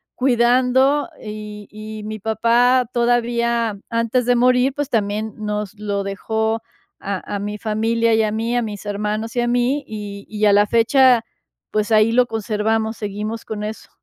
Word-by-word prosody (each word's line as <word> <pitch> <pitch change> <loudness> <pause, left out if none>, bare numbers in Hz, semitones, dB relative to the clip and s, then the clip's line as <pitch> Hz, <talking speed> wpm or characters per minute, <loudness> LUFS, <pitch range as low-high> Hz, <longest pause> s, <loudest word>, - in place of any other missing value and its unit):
cuidando, 255 +4 +3
y 210 -1 -8
y 215 0 -8
mi 215 0 -6
papá 235 +4 +3
todavía 235 -2 +1
antes 230 +1 0
de 245 - +4
morir 250 +2 +3
pues, 290 -2 -2
también 215 0 -1
nos 210 -1 -4
lo 200 -1 -2
dejó 220 +3 -2 0.4
a 200 +1 -4
a - - -2
mi 210 +1 -4
familia 225 +2 +1
y 220 - +4
a 210 - 0
mí, 230 +2 -1
a - - +2
mis 210 -3 -6
hermanos 210 +3 -3
y 240 - +2
a 240 - 0
mí, 245 +4 +1
y 205 -2 -7
y 215 0 0
a 205 - +5
la 205 0 +4
fecha, 240 +2 +4 0.5
pues 215 +1 -1
ahí 215 +1 +5
lo 245 +1 +3
conservamos, 220 0 -1
seguimos 210 +2 -5
con 210 -1 -5
eso. 215 +1 -6
220 Hz, 165 wpm, -20 LUFS, 210-240 Hz, 0.5 s, a